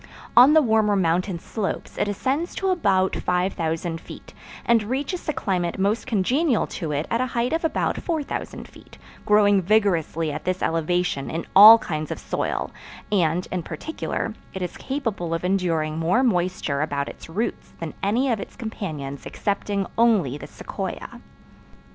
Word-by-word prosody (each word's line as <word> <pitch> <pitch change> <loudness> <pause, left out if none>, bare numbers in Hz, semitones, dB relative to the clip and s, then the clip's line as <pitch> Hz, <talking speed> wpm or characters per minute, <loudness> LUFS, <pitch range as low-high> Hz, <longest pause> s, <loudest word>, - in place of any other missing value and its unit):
On 255 +5 +8
the 315 -1 +6
warmer 220 -3 +3
mountain 180 0 +1
slopes 200 +4 -4
it 205 - 0
ascends 265 - -2
to 385 - -1
about 190 - +2
5000 165 -2 -1
feet, - - -12 0.3
and 235 -1 +4
reaches 270 - -3
the - - -1
climate 180 - -2
most 200 +6 0
congenial 250 - +1
to 160 -5 -5
it 145 +2 -1
at 230 - +1
a 255 - 0
height 245 +2 -1
of 330 - 0
about 325 - 0
4000 315 -5 -4
feet, - - -17 0.3
growing 205 -2 +5
vigorously 170 -5 +1
at 145 - -5
this 185 0 -2
elevation 165 -3 0
in 165 +1 -4
all 215 +4 +11
kinds 155 -7 -4
of - - -4
soil - - -3 0.4
and, 180 -3 +1
in 180 - -1
particular, 170 - -4 0.2
it 190 - -3
is 180 - -5
capable 225 - -3
of 165 - -4
enduring 165 -5 0
more 180 +11 +2
moisture 180 - 0
about 140 -2 -1
its - - -10
roots 205 +8 -3
than 165 -2 -5
any 240 +7 +1
of 225 - 0
its - - -8
companions 155 - -6
excepting 200 -1 -2
only 210 - +3
the 145 - -8
sequoia. - - -6
195 Hz, 160 wpm, -23 LUFS, 165-230 Hz, 0.4 s, all